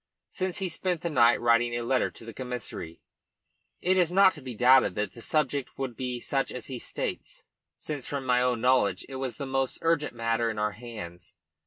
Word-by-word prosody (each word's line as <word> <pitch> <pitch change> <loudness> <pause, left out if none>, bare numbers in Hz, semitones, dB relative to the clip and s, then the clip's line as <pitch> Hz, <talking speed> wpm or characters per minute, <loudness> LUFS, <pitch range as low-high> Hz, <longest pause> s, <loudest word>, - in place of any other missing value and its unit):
Since 185 -1 -3
he 190 - -1
spent 180 0 -1
the 170 - -2
night 120 -5 +5
writing 120 0 +3
a 120 - -2
letter 130 +2 +1
to - - -14
the 115 - -8
Commissary, 125 -10 -6 0.8
it 185 +1 +3
is 175 -2 +3
not 190 0 +6
to 150 - -11
be 130 -3 -7
doubted 125 -4 +5
that 105 -2 -2
the 115 - -11
subject 140 -1 -1
would 130 -3 -3
be 125 -1 -3
such 135 +2 -1
as 125 - -6
he 130 -3 -6
states, - - -5 0.3
since 150 -2 -5
from 140 -4 -3
my 125 -1 +3
own 125 -2 +1
knowledge 125 -5 +2
it 135 - -6
was 130 -4 -4
the 140 - -4
most 135 -1 -1
urgent 165 -5 +1
matter 115 0 0
in 110 - -4
our 105 0 0
hands. 100 -6 -9
125 Hz, 205 wpm, -28 LUFS, 115-140 Hz, 0.8 s, not